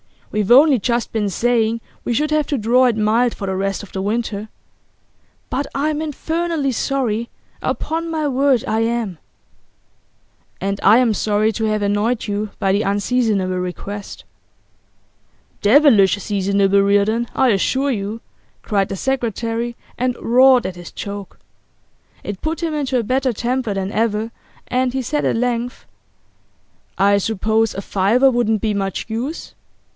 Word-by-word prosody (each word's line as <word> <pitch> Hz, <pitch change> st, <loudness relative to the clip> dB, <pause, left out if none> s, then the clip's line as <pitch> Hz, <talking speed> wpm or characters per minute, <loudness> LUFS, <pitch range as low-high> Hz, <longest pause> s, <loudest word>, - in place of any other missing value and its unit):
We've 210 Hz, -2 st, -1 dB
only 270 Hz, +1 st, +6 dB
just 235 Hz, +2 st, -1 dB
been 210 Hz, -3 st, -1 dB
saying 230 Hz, +1 st, +1 dB, 0.2 s
we 240 Hz, -, 0 dB
should 300 Hz, +5 st, 0 dB
have 305 Hz, -2 st, +1 dB
to 285 Hz, -, -1 dB
draw 245 Hz, +3 st, +3 dB
it 240 Hz, -3 st, +2 dB
mild 225 Hz, +3 st, +2 dB
for 200 Hz, -, -5 dB
the 190 Hz, -1 st, -2 dB
rest 195 Hz, +1 st, -2 dB
of 205 Hz, -, -12 dB
the 190 Hz, -, -4 dB
winter. 210 Hz, 0 st, -2 dB, 1.0 s
But 275 Hz, +2 st, -2 dB
I'm 300 Hz, +2 st, 0 dB
infernally 320 Hz, -1 st, -2 dB
sorry; 235 Hz, -3 st, -1 dB, 0.3 s
upon 330 Hz, +1 st, -2 dB
my 315 Hz, -2 st, -1 dB
word 270 Hz, -2 st, +2 dB
I 220 Hz, -, 0 dB
am.' 225 Hz, -5 st, -1 dB, 1.4 s
'And 195 Hz, +1 st, -2 dB
I 210 Hz, +3 st, +7 dB
am 240 Hz, -3 st, +3 dB
sorry 210 Hz, +1 st, +1 dB
to 220 Hz, +1 st, -2 dB
have 215 Hz, -1 st, 0 dB
annoyed 205 Hz, +4 st, 0 dB
you 205 Hz, +1 st, -2 dB
by 195 Hz, -2 st, +1 dB
the 200 Hz, +2 st, +2 dB
unseasonable 200 Hz, -2 st, 0 dB
request.' 195 Hz, +3 st, -6 dB, 1.4 s
'Devilish 215 Hz, -5 st, +5 dB
seasonable, 200 Hz, 0 st, +1 dB
Reardon, 205 Hz, +4 st, +2 dB
I 265 Hz, -, +3 dB
assure 265 Hz, +7 st, +1 dB
you!' 215 Hz, 0 st, -4 dB, 0.4 s
cried 200 Hz, -2 st, 0 dB
the -, -, -4 dB
secretary, 235 Hz, -1 st, -2 dB, 0.2 s
and 250 Hz, 0 st, 0 dB
roared 255 Hz, 0 st, +5 dB
at 185 Hz, -1 st, -4 dB
his 175 Hz, -1 st, -10 dB
joke. 200 Hz, -1 st, -7 dB, 0.8 s
It 205 Hz, -2 st, -6 dB
put 320 Hz, +2 st, -3 dB
him 325 Hz, -2 st, -1 dB
into 275 Hz, -4 st, -1 dB
a 240 Hz, -, 0 dB
better 255 Hz, +2 st, 0 dB
temper 245 Hz, 0 st, -1 dB
than 195 Hz, 0 st, -2 dB
ever, 220 Hz, +1 st, 0 dB, 0.4 s
and 255 Hz, 0 st, 0 dB
he 265 Hz, -, -1 dB
said 295 Hz, +5 st, -1 dB
at -, -, +1 dB
length: 245 Hz, 0 st, -2 dB, 1.1 s
'I 200 Hz, +1 st, +4 dB
suppose 220 Hz, +2 st, 0 dB
a 195 Hz, -, -3 dB
fiver 215 Hz, +8 st, +3 dB
wouldn't 225 Hz, -3 st, +1 dB
be 215 Hz, -2 st, 0 dB
much 195 Hz, -2 st, -3 dB
use? 245 Hz, +9 st, -4 dB
225 Hz, 150 wpm, -19 LUFS, 205-255 Hz, 1.4 s, I